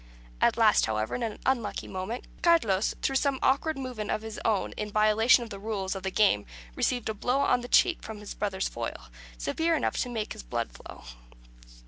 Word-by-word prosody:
At - - +3
last, - - +5
however, 110 0 -1
in 245 - -2
an 225 -3 -3
unlucky 245 -5 -1
moment, 190 +6 -5 0.2
Carlos, 225 - +3
through 270 - +2
some 280 -1 +1
awkward 300 +3 +2
movement 250 -6 -5
of 215 - -1
his 220 0 -6
own 215 -4 +1
in 210 0 -5
violation 215 +4 +4
of 230 - -10
the 200 - -6
rules 200 -2 -3
of 195 - -5
the 190 - -2
game, 185 - +2 0.3
received 245 -3 0
a 220 - -1
blow 250 +6 0
on 250 -3 +3
the 245 - -7
cheek 350 +7 +4
from 220 -1 -7
his 210 0 -8
brother's 195 -2 -2
foil, 115 - -6 0.3
severe 325 - 0
enough 305 - -1
to 250 - -1
make 220 -3 -3
the - - -9
blood - - -3
flow. - - -12
220 Hz, 200 wpm, -28 LUFS, 195-255 Hz, 0.3 s, last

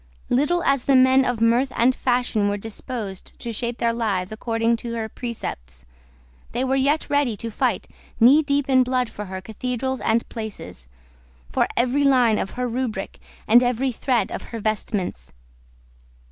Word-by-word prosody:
Little 295 +7 +2
as 275 -2 +1
the 275 - +4
men 260 +1 +6
of 245 -3 -1
mirth 235 +4 +3
and 245 +3 +4
fashion 245 -5 +1
were 205 - -1
disposed 215 -2 -6
to 235 - -5
shape 235 +2 -3
their 230 -1 +1
lives 205 -5 -1
according 230 +1 0
to 235 0 -5
her 225 -1 -3
precepts, 65 - -7 0.7
they 245 +2 0
were 265 0 +1
yet 280 +3 +1
ready 285 -7 +1
to 230 +3 -5
fight - - 0 0.3
knee 260 +7 +7
deep 285 -2 0
in 260 -1 +5
blood 250 -1 0
for 210 - -6
her 190 0 -6
cathedrals 250 +4 -3
and 225 +1 +1
places, 145 - -7 0.6
for - - +2
every 255 +4 +2
line 250 -6 +4
of 190 - -2
her 250 0 0
rubric 235 -5 -3 0.3
and 235 +3 +7
every 250 +1 +1
thread 245 0 0
of - - -4
her 230 - -7
vestments. 200 - -3
235 Hz, 165 wpm, -23 LUFS, 220-260 Hz, 0.7 s, knee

